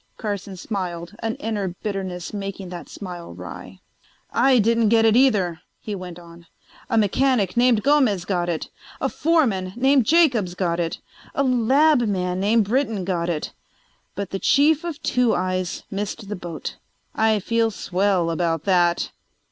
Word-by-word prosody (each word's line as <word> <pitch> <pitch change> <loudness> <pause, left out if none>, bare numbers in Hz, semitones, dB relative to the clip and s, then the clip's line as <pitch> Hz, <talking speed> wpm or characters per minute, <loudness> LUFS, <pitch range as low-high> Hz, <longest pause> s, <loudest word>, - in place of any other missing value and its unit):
Carson 200 -3 -4
smiled, 175 -3 -4
an 225 -1 -2
inner 210 -3 -3 0.2
bitterness 190 -4 -4
making 195 -2 -5
the 175 -1 -7
smile 175 -4 -8
wry. - - -10 0.5
"I 265 -1 +4
didn't 230 0 +3
get 225 0 +4
it 220 -1 +4
either," 200 -10 +3 0.2
he 210 - -6
went 180 -3 -7
on. 170 -1 -14 0.4
"A 230 - +1
mechanic 215 -2 +2
named 240 -3 +3
Gomez 260 -11 +3
got 175 -3 -1
it; 165 -2 -3 0.3
a - - 0
foreman 230 - +1
named 265 -1 +3
Jacobs 255 - +3
got 175 -2 -1
it; 165 -1 -2 0.4
a 280 - +2
lab 265 +4 +4
man 185 -5 -1
named 215 +3 +3
Britton 225 -4 0
got 175 -2 -1
it; 155 -3 -3 0.6
but 200 -1 -4
the 195 - -3
chief 295 - +3
of 335 -4 -5
"Two 250 -2 +2
Eyes" 185 -1 -2
missed 205 +1 -4
the 210 - -3
boat. 175 -3 -6 0.4
I 220 -1 +2
feel 230 +3 +1
swell 190 -4 0
about 165 -2 -1
that." 175 -2 +2
200 Hz, 155 wpm, -23 LUFS, 180-230 Hz, 0.6 s, I